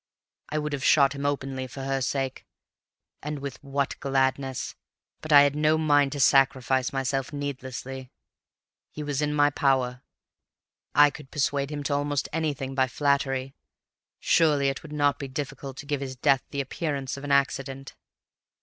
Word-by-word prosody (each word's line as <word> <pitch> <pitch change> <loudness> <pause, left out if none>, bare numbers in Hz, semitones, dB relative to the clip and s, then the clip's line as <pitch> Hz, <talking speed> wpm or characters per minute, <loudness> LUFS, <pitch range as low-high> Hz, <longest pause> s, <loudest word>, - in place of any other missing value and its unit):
I 155 - -2
would 150 -1 -2
have 140 -2 -3
shot 140 -2 +5
him 140 0 -2
openly 135 -2 -3
for 135 +2 -8
her 135 0 -1
sake, 135 0 -2 0.8
and 150 +1 -4
with 140 -1 -7
what 140 0 -2
gladness, 135 -1 0 0.5
but 155 - -6
I 145 -1 +10
had 145 0 +2
no 155 +1 +3
mind 145 -3 +3
to 145 - -4
sacrifice 130 -1 +3
myself 135 0 -1
needlessly. 135 -2 -6 0.8
He 150 - -7
was 145 -1 -2
in 150 0 0
my 145 0 +3
power; 130 -3 +1 0.9
I 145 +1 +7
could 145 -2 -12
persuade 140 -1 0
him 145 -1 -4
to 140 - -1
almost 145 -1 0
anything 145 -4 -2
by 130 -1 +2
flattery; 135 -1 0 0.7
surely 145 -4 +3
it 135 - -4
would 155 - -11
not 145 -2 +1
be 140 - -4
difficult 135 0 -6
to - - -8
give 145 -1 -2
his 130 -1 -5
death 130 +1 +3
the 140 - -2
appearance 140 -1 -3
of 140 - -9
an 145 - -3
accident. 135 -1 0
140 Hz, 165 wpm, -26 LUFS, 135-145 Hz, 0.9 s, I